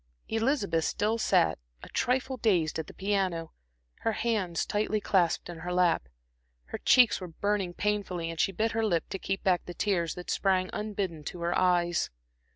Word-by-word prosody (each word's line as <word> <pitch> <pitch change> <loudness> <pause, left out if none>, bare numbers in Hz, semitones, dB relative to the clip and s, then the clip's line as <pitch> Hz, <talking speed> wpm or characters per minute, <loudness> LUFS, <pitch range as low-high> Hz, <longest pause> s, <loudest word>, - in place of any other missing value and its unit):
Elizabeth 225 - +1
still 215 +3 0
sat, - - +3 0.2
a - - -9
trifle 260 +1 0
dazed, 180 -10 +1
at 160 - -4
the - - -11
piano, 190 -5 -1 0.5
her 225 - 0
hands 205 -8 0
tightly 215 +1 0
clasped 180 -5 +1
in 175 -2 -8
her 175 +2 -5
lap. 175 - +2 0.6
Her - - -5
cheeks 240 -6 +5
were 180 - -5
burning 190 +1 -1
painfully 190 -5 -1
and 165 - -8
she - - +3
bit 220 +4 0
her 225 +1 0
lip 175 -7 +1
to 195 - -4
keep 195 +1 -3
back 180 -2 +2
the 175 - -7
tears 175 -5 0
that 180 - -5
sprang 185 -2 +1
unbidden 200 -7 -3
to 175 - -6
her 170 +1 0
eyes. 175 -2 +2
190 Hz, 175 wpm, -29 LUFS, 175-210 Hz, 0.6 s, cheeks